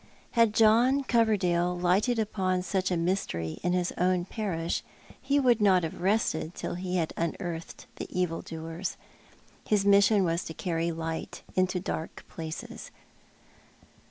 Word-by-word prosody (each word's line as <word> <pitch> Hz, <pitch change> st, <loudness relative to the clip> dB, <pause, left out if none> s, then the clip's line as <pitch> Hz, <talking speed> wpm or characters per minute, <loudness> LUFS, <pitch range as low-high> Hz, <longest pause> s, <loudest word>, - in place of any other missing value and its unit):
Had 230 Hz, -2 st, +3 dB
John 235 Hz, +5 st, +5 dB
Coverdale 185 Hz, -8 st, +2 dB
lighted 190 Hz, +7 st, +2 dB
upon 185 Hz, -4 st, 0 dB
such 185 Hz, +1 st, 0 dB
a 180 Hz, -, 0 dB
mystery 165 Hz, -, -2 dB
in 180 Hz, +1 st, 0 dB
his 180 Hz, -1 st, 0 dB
own 180 Hz, 0 st, +2 dB
parish 180 Hz, -6 st, -2 dB, 0.4 s
he 280 Hz, +2 st, +2 dB
would 245 Hz, -5 st, +3 dB
not 190 Hz, -3 st, +5 dB
have 160 Hz, +1 st, -5 dB
rested 185 Hz, -4 st, 0 dB
till -, -, -4 dB
be 180 Hz, 0 st, -3 dB
had 165 Hz, -3 st, 0 dB
unearthed 170 Hz, 0 st, -4 dB
the -, -, -5 dB
evil 180 Hz, -2 st, -1 dB
doers. 165 Hz, +3 st, -5 dB, 0.7 s
His 205 Hz, -2 st, +2 dB
mission 200 Hz, 0 st, +5 dB
was 170 Hz, 0 st, 0 dB
to 160 Hz, -, -7 dB
carry 170 Hz, -1 st, -1 dB
light 160 Hz, 0 st, -5 dB
into 185 Hz, 0 st, +1 dB
dark 160 Hz, -2 st, -5 dB
places. 160 Hz, -1 st, -7 dB
180 Hz, 140 wpm, -28 LUFS, 170-205 Hz, 0.7 s, John